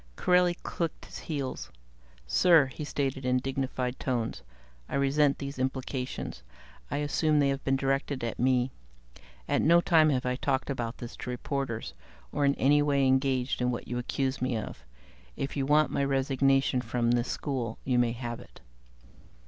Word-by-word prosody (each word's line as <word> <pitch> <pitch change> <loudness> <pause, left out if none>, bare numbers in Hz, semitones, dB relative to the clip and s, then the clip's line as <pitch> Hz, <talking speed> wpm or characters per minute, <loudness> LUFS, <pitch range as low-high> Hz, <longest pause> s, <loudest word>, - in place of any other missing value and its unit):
Corelli 180 - +3
clicked 165 -2 -3
his - - -9
heels. 140 -5 -4 0.6
"Sir," 165 - +5
he 130 +3 -7
stated 135 -2 -2
in 125 0 +2
dignified 130 -1 -2
tones, 120 -4 -2 0.5
"I - - -3
resent 140 +1 +3
these 140 -1 -6
implications. 130 0 -3 0.5
I 145 - -2
assume 150 +1 +1
they 140 -1 +3
have 135 0 -2
been 135 - +2
directed 135 0 -1
at 115 - -3
me. 125 0 +2 0.8
At - - +2
no 170 +2 +6
time 165 -3 +4
have 130 -4 0
I 125 0 0
talked 135 0 -1
about 120 -3 -3
this 120 - -8
to - - -6
reporters, 125 -1 -3 0.4
or 145 0 +1
in 140 0 +3
any 145 +2 +4
way 140 -2 +2
engaged 130 -1 +1
in 125 - +2
what 120 - -4
you 120 0 -2
accuse 130 +2 -2
me 125 -2 0
of. 110 - -7 0.5
If 135 - -3
you 135 -2 -1
want 150 +1 +4
my 140 - 0
resignation 135 -1 +2
from 120 -1 0
this 120 0 +1
school, 125 -6 -3
you 125 -2 +2
may 120 -1 +2
have 120 -1 -5
it." - - -15
135 Hz, 170 wpm, -29 LUFS, 125-140 Hz, 0.8 s, no